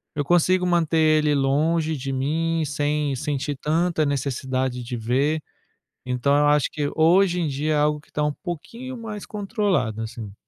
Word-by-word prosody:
eu 145 - 0
consigo 180 +3 +3
manter 170 -2 +2
ele 155 -1 +3
longe 155 +4 +1
de 135 +1 -4
mim 160 +5 0
sem 145 0 -1
sentir 145 +1 -2
tanta 160 +2 +1
necessidade 130 -2 -2
de 120 +1 -5
ver. 135 +7 0 0.6
Então 125 +3 +1
eu 145 0 +3
acho 150 -1 +3
que 145 -2 -2
hoje 175 +3 +4
em 165 - 0
dia 150 +2 -1
é - - +2
algo 150 0 +1
que - - -26
está 150 - -1
um 150 - 0
pouquinho 230 - -7
mais 215 -3 -7
controlado, 195 - -1
assim. 110 -2 -7
150 Hz, 165 wpm, -23 LUFS, 135-165 Hz, 0.6 s, hoje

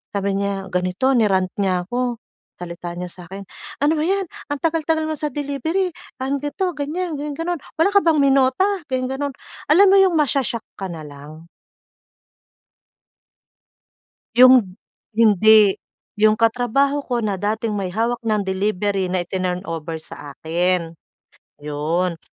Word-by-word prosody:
Sabi 200 0 0
niya 200 -1 -2
ganito, 180 +8 0
ni-rant 190 -5 +2
niya 185 -2 +1
ako, 245 0 -2 0.4
salita 175 0 -6
niya 180 +1 -5
sa 180 - -12
akin: 195 +2 -8 0.4
"Ano 305 +2 +3
ba - - +1
'yan 390 +1 +1 0.3
ang 290 - -2
tagal-tagal 320 -1 +1
mo 315 - -2
sa 300 -2 -2
delivery, 300 +7 -2 0.3
ah, 265 - -2
ganto, 340 +5 -2
ganyan 315 +4 -3
ganon-ganon. 315 +3 -3 0.2
Wala 335 - +4
ka - - +9
bang 320 -3 +3
minota?" 275 +5 +3 0.2
ganon 255 -1 0
ganon. 280 +1 -3 0.4
Alam 385 +6 +7
mo 395 - +6
'yong 375 -3 +4
masho-shock 265 -5 0 0.2
ka 190 - -3
na 160 -2 -7
lang. 150 +3 -12 2.9
Yung 245 -6 +6 0.4
hindi, 215 -2 +5 0.4
yung 215 0 +5
katrabaho 245 +5 +1
ko 240 -3 -1
na 200 -3 -1
dating 215 +2 -1
may 200 -3 -2
hawak 230 +6 -1
ng 215 -3 0
delivery 195 0 -1
na 180 -1 -1
itinurn 180 0 -3
over 165 -2 -5
sa 145 -3 -10
akin. 170 +1 0 0.7
Yun, 160 +4 -1
220 Hz, 140 wpm, -21 LUFS, 185-285 Hz, 2.9 s, ka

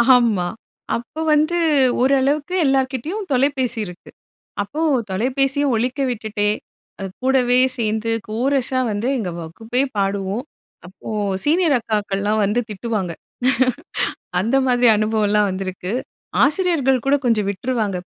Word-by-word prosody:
ஆமா. 220 -8 +2 0.5
அப்ப 240 +7 -6
வந்து, 310 +3 +2 0.5
ஓரளவுக்கு 275 +5 +2
எல்லார்கிட்டயும் 270 - 0
தொலைபேசி 260 -2 +1
இருக்கு. 180 -2 -11 0.5
அப்போ 280 +10 -4 0.3
தொலைபேசிய 265 +8 +1
ஒலிக்க 250 +5 -1
விட்டுட்டே, 215 -3 -1 0.5
அ - - -3 0.2
கூடவே 255 -1 +3 0.2
சேர்ந்து 220 0 -1 0.2
கோரஸா 255 +3 0
வந்து 205 +3 -2
எங்க 195 -7 -3
வகுப்பே 225 +10 -3 0.2
பாடுவோம்! 200 +4 -1 0.4
அப்போ 185 - -11 0.4
சீனியர் 320 0 +3
அக்காக்கள்லாம் 210 -1 -1
வந்து 210 +5 +1
திட்டுவாங்க. 210 -3 -3 1.3
அந்த 230 +8 +1
மாதிரி 245 -1 +4
அனுபவம் 215 0 +1
எல்லாம் 210 -1 +3
வந்திருக்கு! 185 0 -4 0.5
ஆசிரியர்கள் 285 -5 +1
கூட 275 - +4
கொஞ்சம் 220 -4 +2
விட்டுருவாங்க. 210 -1 -2
235 Hz, 110 wpm, -20 LUFS, 205-270 Hz, 1.3 s, மாதிரி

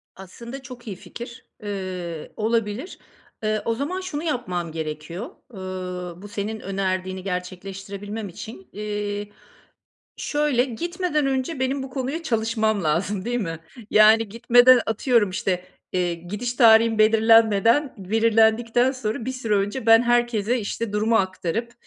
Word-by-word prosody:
Aslında 235 +8 -9
çok 250 -3 -11
iyi 195 - -4
fikir. 240 +6 -10 0.2
Eee, 185 -5 -5
olabilir. 225 - -2 0.4
Eee, 215 0 0
o 230 - 0
zaman 310 +9 -3
şunu 335 -4 -4
yapmam 185 - -2
gerekiyor. 160 +6 -5 0.2
Iıı, 180 -2 -6
bu 205 - -9
senin 215 +1 -4
önerdiğini 185 -1 -2
gerçekleştirebilmem 195 +3 -5
için, 195 +2 -10
iii, 205 0 -4 0.8
şöyle, 290 -4 +1
gitmeden 330 +4 -1
önce 265 +2 -1
benim 265 +1 0
bu 265 - -7
konuya 270 +5 -3
çalışmam 220 - 0
lazım, 185 +5 0
değil 245 +1 -1
mi? 165 -4 -4 0.3
Yani, 215 +1 +6
gitmeden, 245 +3 +6
atıyorum, 225 -2 +2
işte, 185 -1 -1 0.3
eee, 180 -2 0
gidiş 210 +8 -4
tarihim 225 -2 +6
belirlenmeden, 225 +4 +4
belirlendikten 225 +4 +3
sonra, 225 -3 -3
bir 260 - -2
süre 235 -5 -1
önce 205 +5 -2
ben 225 +1 +7
herkese, 240 -1 +1
işte, 220 0 -4
durumu 220 +2 +2
aktarıp, 190 +3 -1
220 Hz, 130 wpm, -23 LUFS, 195-240 Hz, 0.8 s, ben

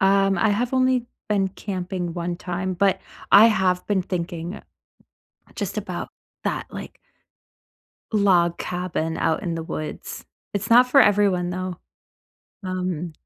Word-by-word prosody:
Um, 195 -1 +3
I 220 +3 +3
have 235 +5 0
only 255 -2 +2 0.2
been 195 -2 +2
camping 185 -3 -4
1 175 0 -3
time, 185 +1 -3
but 195 +1 +2 0.3
I 210 +3 +9
have 190 -5 +1
been 200 -3 +1
thinking 175 +1 -4 1.0
just - - -4
about - - -4 0.3
that, - - -2
like - - -9 1.1
log 180 -5 +3
cabin 175 -3 -2
out 160 -1 +1
in 175 -4 -2
the 165 - -3
woods. 155 -1 -6 0.3
It's 205 +2 -2
not 245 +2 +7
for 275 +2 +6
everyone, 200 -5 +3
though, 185 0 -4 0.9
um, 180 -3 -3
185 Hz, 130 wpm, -23 LUFS, 175-205 Hz, 1.1 s, I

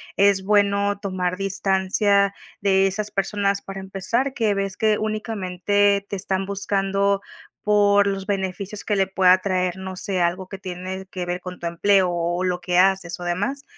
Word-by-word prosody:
es 200 -1 +4
bueno 200 0 +2
tomar 185 -2 -2
distancia 195 +1 +1 0.3
de 195 -1 +3
esas 210 +2 -3
personas 200 0 0
para 195 0 -7
empezar, 230 +8 -2
que 225 -6 +1
ves 195 -1 -3
que 215 -1 +2
únicamente 205 -2 0
te - - -3
están 190 0 -2
buscando 200 0 0 0.4
por 205 -1 +4
los 195 -1 -2
beneficios 200 0 -3
que 210 - 0
le 195 -1 +2
pueda 185 -1 +5
traer, 185 -2 -1
no 190 -1 -7
sé, 190 -3 -1
algo 180 +2 0
que 195 - -8
tiene 185 +1 -6
que 180 -1 -4
ver 175 +1 -3
con 180 0 -8
tu 170 - -3
empleo 185 +2 +3
o 175 +1 -1
lo 180 -1 -1
que 180 0 0
haces 185 -2 +2
o 175 - -6
demás. 205 +11 -2
195 Hz, 170 wpm, -23 LUFS, 185-200 Hz, 0.4 s, pueda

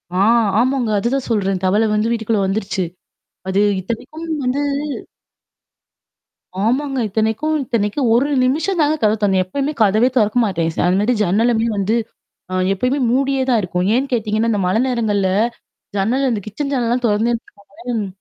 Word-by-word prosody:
ஆ - - 0 0.4
ஆமாங்க, 255 -1 +1
அதுதான் 245 +5 -1
சொல்றேன். 195 -4 0
தவளை 210 +4 +2
வந்து 215 +2 +1
வீட்டுக்குள்ள 220 -2 0
வந்துருச்சு. 195 -1 -2 0.7
அது 190 +1 +1 0.2
இத்தனைக்கும் 240 - -6 0.2
வந்து 255 +3 0 2.1
ஆமாங்க. 270 +3 0
இத்தனைக்கும் 220 +9 0
இத்தனைக்கும் 235 0 0
1 250 +5 +3 0.2
நிமிஷம் 320 +8 0
தாங்க 300 +1 +2
கதவை 215 0 +3
தொறந்தேன். 190 -2 +3
எப்பயுமே 280 +10 -2
கதவே 215 +4 +3
தொறக்க 215 0 +2
மாட்டேன். 170 -5 -1
ச - - -19
அது 180 +1 +2
மாதிரி 240 +4 +1
ஜன்னலுமே 225 +4 +2
வந்து 200 +3 +1 0.6
அ - - -4 0.2
எப்பயுமே 250 +8 0
மூடியே 270 +1 +1
தான் 240 -3 +3
இருக்கும். 180 -1 -2
ஏன்னு 260 +4 +1
கேட்டீங்கன்னா, 220 0 0
இந்த 210 - 0
மழை 185 +5 +1
நேரங்கள்ல 210 -6 0 0.7
ஜன்னல் 240 +8 +1
அந்த 225 -4 -1
கிச்சன் 275 +7 -4
ஜன்னல்லாம் 245 -1 0
தொறந்தேன் 225 +3 +1
வச்சிக்கோங்களேன் 225 +3 -8
ம். 200 - -3
225 Hz, 150 wpm, -19 LUFS, 205-255 Hz, 2.1 s, 1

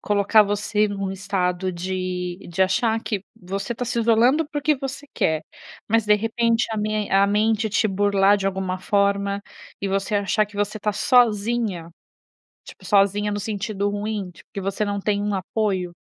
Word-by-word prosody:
Colocar 205 +1 +4
você 210 +1 0
num 195 -1 -3
estado 190 -1 -1
de 180 0 -3
de 175 +2 +1
achar 220 +4 +1
que 205 -4 -3
você 195 +2 -4
está 240 +1 -4
se 235 0 -2
isolando 235 +7 +3
porque 295 0 +1
você 270 +1 -6
quer, 160 0 +1 0.5
mas 225 -1 +2
de 210 - +6
repente 230 +2 +1
a - - -2
me 215 0 -1
a 195 +1 +4
mente 215 +2 +1
te 210 +2 +2
burlar 200 0 +3
de 195 - -2
alguma 190 -1 -2
forma, 200 0 0 0.4
e 200 - -1
você 195 +2 -1
achar 205 +1 +1
que 205 0 -14
você 205 +1 -1
está 210 0 -1
sozinha? 215 -6 +2 0.8
Tipo, - - -13
sozinha 205 0 +2
no 205 - -2
sentido 205 0 -2
ruim, 205 -2 -3
tipo, 160 - -19
que - - -5
você 195 +2 -2
não 205 -1 -2
tem 205 0 0
um 205 0 -1
apoio? 190 -2 -2
205 Hz, 170 wpm, -23 LUFS, 195-220 Hz, 0.8 s, de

